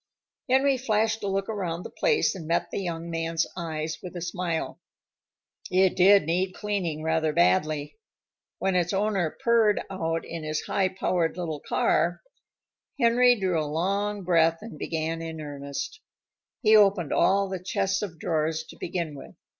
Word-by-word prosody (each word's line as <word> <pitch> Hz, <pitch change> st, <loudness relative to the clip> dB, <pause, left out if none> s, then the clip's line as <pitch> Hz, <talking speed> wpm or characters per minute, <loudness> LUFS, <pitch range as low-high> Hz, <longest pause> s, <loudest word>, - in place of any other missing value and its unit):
Henry 265 Hz, +1 st, +4 dB
flashed 220 Hz, -2 st, +1 dB
a -, -, -1 dB
look 195 Hz, 0 st, -1 dB
around 180 Hz, -5 st, -3 dB
the -, -, -8 dB
place, 475 Hz, -3 st, +2 dB
and 175 Hz, -6 st, -8 dB
met 170 Hz, +1 st, 0 dB
the -, -, -2 dB
young 170 Hz, -2 st, -4 dB
man's 165 Hz, 0 st, 0 dB
eyes 160 Hz, -3 st, -4 dB
with 180 Hz, 0 st, -8 dB
a 175 Hz, -, -5 dB
smile. 175 Hz, -2 st, -3 dB, 0.9 s
It 185 Hz, 0 st, +3 dB
did 195 Hz, +2 st, +6 dB
need 180 Hz, +4 st, -1 dB
cleaning 185 Hz, -7 st, -2 dB
rather 160 Hz, -1 st, +1 dB
badly. 155 Hz, -, +1 dB, 0.6 s
When 190 Hz, -1 st, 0 dB
its 175 Hz, +1 st, +1 dB
owner 195 Hz, -4 st, +1 dB
purred 230 Hz, -3 st, +4 dB
out 165 Hz, -3 st, -2 dB
in 165 Hz, -1 st, -6 dB
his 155 Hz, 0 st, -2 dB
high 190 Hz, -1 st, 0 dB
powered 180 Hz, -3 st, -1 dB
little 160 Hz, -4 st, -3 dB
car, -, -, +1 dB, 0.8 s
Henry 245 Hz, 0 st, +5 dB
drew 180 Hz, -4 st, +1 dB
a 150 Hz, -, -3 dB
long 200 Hz, +5 st, -1 dB
breath 165 Hz, -2 st, +3 dB
and 225 Hz, -, -9 dB
began 165 Hz, 0 st, -2 dB
in 160 Hz, -1 st, -6 dB
earnest. 145 Hz, -, -6 dB, 0.6 s
He 220 Hz, -1 st, +6 dB
opened 195 Hz, -7 st, +4 dB
all 195 Hz, +1 st, +3 dB
the 190 Hz, -2 st, -5 dB
chests 190 Hz, +1 st, 0 dB
of 185 Hz, -6 st, -5 dB
drawers 160 Hz, 0 st, -1 dB
to -, -, -12 dB
begin 170 Hz, -3 st, -3 dB
with. 140 Hz, -, -11 dB
180 Hz, 160 wpm, -26 LUFS, 160-200 Hz, 0.9 s, did